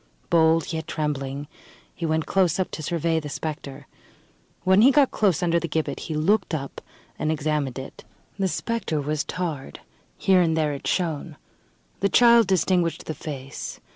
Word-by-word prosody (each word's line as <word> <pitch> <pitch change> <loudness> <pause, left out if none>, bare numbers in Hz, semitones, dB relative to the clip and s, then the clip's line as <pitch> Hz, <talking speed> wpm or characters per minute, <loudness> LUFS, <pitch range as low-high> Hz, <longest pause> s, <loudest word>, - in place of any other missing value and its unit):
Bold, 165 0 +3
yet 160 0 -4
trembling, 145 -2 -3 0.5
he 165 - -3
went 160 0 0
close 185 -2 +2
up 185 - -1
to - - -5
survey 165 +1 0
the 150 -2 -7
spectre. 145 -2 -6 0.8
When 190 +2 +5
he 250 - +8
got 280 -1 +4
close 190 -5 +1
under 170 -1 +2
the 170 - -3
gibbet, 150 -3 -2
he 160 - -5
looked 180 +3 +1
up 140 -3 -6 0.4
and 155 - 0
examined 150 -3 -1
it. 130 - -8 0.4
The 195 - +2
spectre 225 -5 -2
was 150 +1 -1
tarred; 160 -7 -5 0.4
here 190 -1 +4
and 160 -2 +1
there 150 -2 +1
it 140 - -6
shone. 165 -3 -1 0.6
The 200 - +2
child 235 -2 +6
distinguished 175 -3 +1
the 155 - -3
face. 140 -4 -7
160 Hz, 165 wpm, -24 LUFS, 150-180 Hz, 0.8 s, he